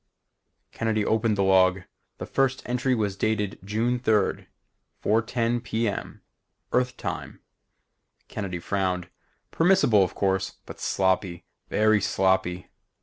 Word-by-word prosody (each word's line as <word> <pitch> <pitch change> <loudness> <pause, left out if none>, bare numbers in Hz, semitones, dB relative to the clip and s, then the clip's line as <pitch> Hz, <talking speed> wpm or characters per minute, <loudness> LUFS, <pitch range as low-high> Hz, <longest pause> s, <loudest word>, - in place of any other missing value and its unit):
Kennedy 110 -2 -1
opened 110 -1 +1
the 100 - +2
log. 95 0 +4 0.4
The - - -6
first 135 -1 0
entry 125 +1 0
was 105 -4 -1
dated 105 -1 -1
June 115 +5 0
3rd, 110 -4 +1 0.6
4:10 115 +2 +1
p. 115 +1 -1
m. 100 - -5 0.5
Earth 125 0 +1
time. - - -5 0.9
Kennedy 95 -4 -4
frowned. 90 0 -2 0.4
Permissible 165 - +4
of 90 - -3
course, 95 -1 0
but - - -10
sloppy, 95 -2 0 0.3
very 110 -1 +3
sloppy. 95 -2 0
105 Hz, 115 wpm, -26 LUFS, 95-115 Hz, 0.9 s, log